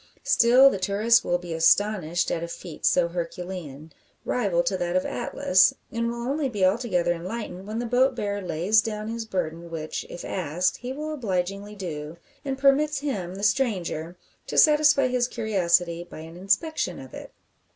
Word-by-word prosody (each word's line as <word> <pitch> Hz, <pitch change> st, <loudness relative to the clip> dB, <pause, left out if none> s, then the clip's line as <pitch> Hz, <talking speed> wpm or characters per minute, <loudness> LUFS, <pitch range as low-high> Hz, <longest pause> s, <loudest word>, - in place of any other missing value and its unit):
Still 250 Hz, +4 st, +6 dB
the 195 Hz, -, -3 dB
tourist 205 Hz, +5 st, +3 dB
will 175 Hz, -, +1 dB
be 175 Hz, -1 st, -7 dB
astonished 175 Hz, 0 st, +2 dB
at 165 Hz, -, -1 dB
a 170 Hz, -, -4 dB
feat 170 Hz, -1 st, -4 dB
so 175 Hz, -1 st, +3 dB
herculean 170 Hz, -3 st, -6 dB, 0.3 s
rival 195 Hz, -8 st, +1 dB
to 190 Hz, +3 st, 0 dB
that 175 Hz, -1 st, -2 dB
of 185 Hz, -, +1 dB
Atlas 185 Hz, 0 st, +2 dB, 0.2 s
and 230 Hz, 0 st, -1 dB
will 235 Hz, 0 st, -5 dB
only 280 Hz, 0 st, -1 dB
be 205 Hz, -6 st, +1 dB
altogether 185 Hz, -4 st, +1 dB
enlightened 185 Hz, +1 st, -6 dB
when 215 Hz, +1 st, -4 dB
the 240 Hz, -, -2 dB
boat 250 Hz, +2 st, +2 dB
bearer 205 Hz, -3 st, -3 dB
lays 185 Hz, +5 st, +2 dB
down 215 Hz, -1 st, -4 dB
his 230 Hz, 0 st, -4 dB
burden 170 Hz, -4 st, -4 dB
which, 160 Hz, -2 st, -5 dB
if 175 Hz, -, -8 dB
asked, 180 Hz, +1 st, -1 dB
he 250 Hz, +1 st, -6 dB
will 305 Hz, +3 st, -4 dB
obligingly 200 Hz, -4 st, -3 dB
do 160 Hz, -4 st, -6 dB, 0.3 s
and 270 Hz, -1 st, -3 dB
permits 280 Hz, +2 st, +3 dB
him, 190 Hz, -11 st, -3 dB
the 200 Hz, -, -7 dB
stranger, 185 Hz, -, -1 dB, 0.3 s
to -, -, -4 dB
satisfy 300 Hz, -3 st, +5 dB
his 250 Hz, -1 st, +1 dB
curiosity 175 Hz, -7 st, 0 dB
by 165 Hz, -, -11 dB
an 165 Hz, +1 st, -11 dB
inspection 195 Hz, -, -1 dB
of 130 Hz, -1 st, -11 dB
it. -, -, -9 dB
195 Hz, 170 wpm, -25 LUFS, 175-235 Hz, 0.3 s, Still